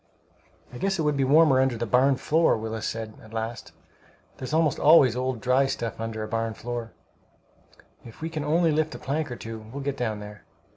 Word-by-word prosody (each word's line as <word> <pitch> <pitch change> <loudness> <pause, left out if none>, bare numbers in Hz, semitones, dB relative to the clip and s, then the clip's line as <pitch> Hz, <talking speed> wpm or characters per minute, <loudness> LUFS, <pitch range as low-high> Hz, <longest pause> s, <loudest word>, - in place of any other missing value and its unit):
"I 125 - -8
guess 195 0 0
it 160 - 0
would 150 -1 +1
be 140 - +1
warmer 140 0 +5
under 130 -3 +1
the 120 - -2
barn 130 +5 +3
floor," 160 +3 +2
Willis 110 0 -4
said, 110 -1 -5
at 110 0 -15
last. 115 +1 -5 0.7
"There's 130 - -6
almost 160 -1 +2
always 145 -6 +6
old 130 -2 -2
dry 130 +4 +3
stuff 115 -4 -4
under 110 -1 -4
a - - -5
barn 115 0 -2
floor. 120 -1 -5 1.1
If 115 - -13
we 160 - -3
can 155 -2 -3
only 160 +2 +2
lift 155 +1 0
up - - -10
a - - -14
plank 145 0 -2
or - - -4
two, 115 -1 -7
we'll 115 +6 -8
get 140 0 -2
down 110 -4 -2
there." 105 0 -10
125 Hz, 210 wpm, -26 LUFS, 115-150 Hz, 1.1 s, always